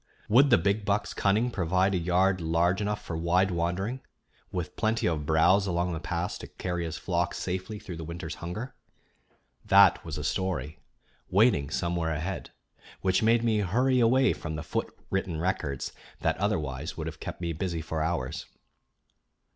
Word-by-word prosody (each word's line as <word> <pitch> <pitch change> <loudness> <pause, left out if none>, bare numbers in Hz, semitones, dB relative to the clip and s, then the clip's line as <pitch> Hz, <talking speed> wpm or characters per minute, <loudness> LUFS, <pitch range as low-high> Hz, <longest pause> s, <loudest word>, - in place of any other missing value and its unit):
Would 135 +6 +6
the 120 - +7
big 100 +5 +1
buck's 100 +1 0
cunning 110 +5 +2
provide 95 0 +1
a - - +2
yard 90 +2 +2
large 85 +4 +2
enough 105 0 -2
for 85 - -4
wide 90 +4 +2
wandering, 90 +9 -1 0.5
with 90 -3 -4
plenty 110 0 0
of 75 -4 -1
browse 95 +5 +4
along 90 0 0
the 80 - -3
paths 85 +1 -3
to - - -8
carry 90 -2 -3
his 80 0 -4
flock 85 -2 -1
safely 95 +4 -3
through 90 -4 -8
the 80 - -6
winter's 85 +1 -5
hunger? 105 +10 -5 0.9
That - - +6
was 80 -2 -5
a 75 - -4
story, 90 -3 -2 0.5
waiting 95 - +3
somewhere 85 0 -1
ahead, 80 +5 -3 0.5
which 95 -1 +2
made 115 +1 +4
me 110 -2 +2
hurry 125 +7 +2
away 130 +3 +4
from 80 -2 -5
the 80 - -4
foot 75 - -2 0.2
written 95 -4 -1
records 80 -6 -2 0.3
that - - +1
otherwise 80 -7 -2
would 80 - -4
have 80 -3 -6
kept - - -6
me 85 -1 -2
busy 85 0 -2
for 80 0 -3
hours. 80 -5 -2
90 Hz, 170 wpm, -28 LUFS, 80-100 Hz, 0.9 s, the